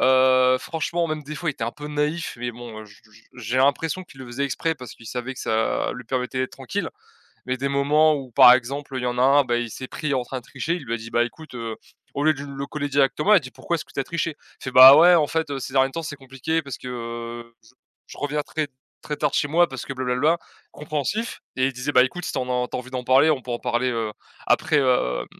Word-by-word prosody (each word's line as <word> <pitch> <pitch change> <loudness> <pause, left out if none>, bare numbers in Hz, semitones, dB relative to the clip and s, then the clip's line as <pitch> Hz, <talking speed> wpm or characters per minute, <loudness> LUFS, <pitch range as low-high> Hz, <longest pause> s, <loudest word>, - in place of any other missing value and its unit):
Heu, 130 0 +5
franchement 170 +2 -2
même 155 -1 -3
des 150 +2 -7
fois, 165 +1 -4
il - - -5
était 115 - -4
un 115 - -2
peu 150 0 -9
naïf 150 +3 -2
mais 120 0 -3
bon, 115 -2 -9
heu, - - -10
je 100 - -17
je 110 - -23 0.3
j'ai 120 +2 -3
l'impression 160 +6 +1
qu'il 135 -6 -16
le 130 - -8
faisait 125 +4 -3
exprès, 150 +5 -1
parce 125 -5 -10
qu'il 115 - -15
savait 125 +2 -5
que - - -9
ça 110 0 0
lui 125 -1 -9
permettait 130 +1 -2
d'être 130 - -2
tranquille, - - -4 0.6
mais 130 0 -1
des 140 +2 -2
moments 150 +3 +3
où 135 -3 -6
par 125 +2 +9
exemple, 135 +2 -1
il - - -4
y - - -1
en 125 0 -2
a - - +3
un, 140 +1 +5
bah, 120 -1 0
il 120 -2 -2
s'est 130 - -7
pris 150 -2 -2
en 130 - 0
train 130 +1 -5
de 120 - -14
tricher, 165 +2 -3
il 155 - -8
lui 115 -1 -2
a - - -1
dit: 115 0 -9
«Bah 120 0 +2
écoute, 155 +3 -10
heu», 115 -2 -5 0.4
au 145 - -1
lieu 155 0 +4
du 140 - -7
le 140 0 -6
coller 145 0 -4
directement, 145 +7 +2
il 210 - +9
a - - +7
dit: 130 -6 -10
«Pourquoi 130 +7 -3
est-ce 155 - -6
que - - -20
tu - - -1
as 135 - -2
triché?» 165 -2 -2 0.3
Il - - -11
fait: 130 - -3
«Bah, 130 +3 +11
ouais 175 +2 +7
en 155 -3 +4
fait, 160 -1 -1
heu, 140 - -2
ces 130 - -6
derniers 135 0 +3
temps 165 - -4
c'est 145 -1 -6
compliqué 135 +4 -3
parce 140 -4 -7
que, 125 - -8
heu, 115 -1 -7
je 110 - -21 0.4
je - - -12
reviens 145 +1 -1
très 155 0 -3 0.3
très 150 - -4
tard - - 0
de - - -9
chez - - +2
moi 170 +3 +4
parce 130 -3 -6
que - - -4
blablabla». 130 +6 +1 0.3
Compréhensif 155 - -3 0.2
et 130 - +2
il 135 - -1
disait: 130 +3 -3
«Bah, 125 - +7
écoute, 170 +7 -3
si - - -3
tu - - -2
en 125 -1 -1
as - - -7
tu - - -4
as - - -3
envie 130 +1 -13
d'en 125 -1 -4
parler, 135 +5 +5
on 140 -4 +1
peut 125 - -8
en 120 - -2
parler, 125 +2 0
heu, 115 -2 -2 0.3
après, 155 -1 +3
hem, 125 - +1
130 Hz, 285 wpm, -23 LUFS, 125-150 Hz, 0.6 s, Bah